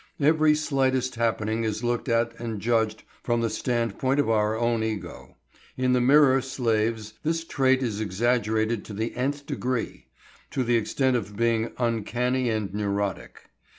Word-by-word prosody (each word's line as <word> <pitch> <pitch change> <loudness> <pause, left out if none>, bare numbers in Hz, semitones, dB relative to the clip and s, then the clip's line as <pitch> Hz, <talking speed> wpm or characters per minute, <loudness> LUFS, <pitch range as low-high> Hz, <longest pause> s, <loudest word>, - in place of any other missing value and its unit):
Every 155 +1 +4
slightest 130 -4 0
happening 115 -1 -1
is 110 +1 -2
looked 120 +1 -1
at 115 0 +1
and 115 -3 -4
judged 110 -1 0 0.2
from 120 -1 0
the 115 -1 0
standpoint 120 +3 -1
of 140 -5 +2
our 110 0 +1
own 115 -1 +1
ego. 110 -2 -5 0.4
In 130 0 +2
the 125 - +3
mirror 135 0 +5
slaves 115 -4 -1
this 165 +1 -1
trait 130 -4 +2
is 110 -3 -2
exaggerated 110 +1 0
to 105 - -8
the 110 +3 -3
n 130 +3 +1
th 145 0 -12
degree, 130 -4 -3 0.4
to 130 - -1
the 120 0 +2
extent 130 +3 +1
of 105 -3 -4
being 115 0 +1
uncanny 120 +2 0
and 105 -4 -2
neurotic. 100 -2 -3
115 Hz, 155 wpm, -26 LUFS, 110-130 Hz, 0.4 s, mirror